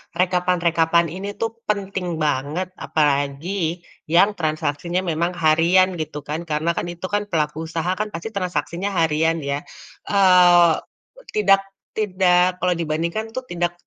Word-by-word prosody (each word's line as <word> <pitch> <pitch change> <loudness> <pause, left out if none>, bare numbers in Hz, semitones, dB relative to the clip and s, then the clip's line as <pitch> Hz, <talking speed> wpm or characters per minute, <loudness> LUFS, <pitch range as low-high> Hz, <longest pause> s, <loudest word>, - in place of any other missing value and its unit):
rekapan-rekapan 170 -2 +2
ini 200 +3 -6
tuh 225 -1 -2 0.2
penting 195 -4 -2
banget, 155 +4 -2
apalagi 155 +4 -1 0.2
yang 175 +6 +4
transaksinya 155 +3 -1
memang 170 0 -1
harian 170 +3 +3
gitu 150 -2 -5
kan, 160 +3 -5
karena 155 +2 0
kan 170 - -3
itu 170 - -22
kan 205 0 -1
pelaku 160 -2 -2
usaha 165 +2 -2
kan 215 - -1
pasti 210 +2 -7
transaksinya 190 0 -3
harian 160 0 +1
ya? 140 0 -2 0.5
Eee, 180 -3 +6 0.6
tidak, 195 -2 +4 0.4
tidak 185 -3 +2
kalau 180 - +3
dibandingkan 170 +6 -2
tuh 255 - -2
tidak, 175 0 -1
170 Hz, 130 wpm, -21 LUFS, 160-185 Hz, 0.6 s, Eee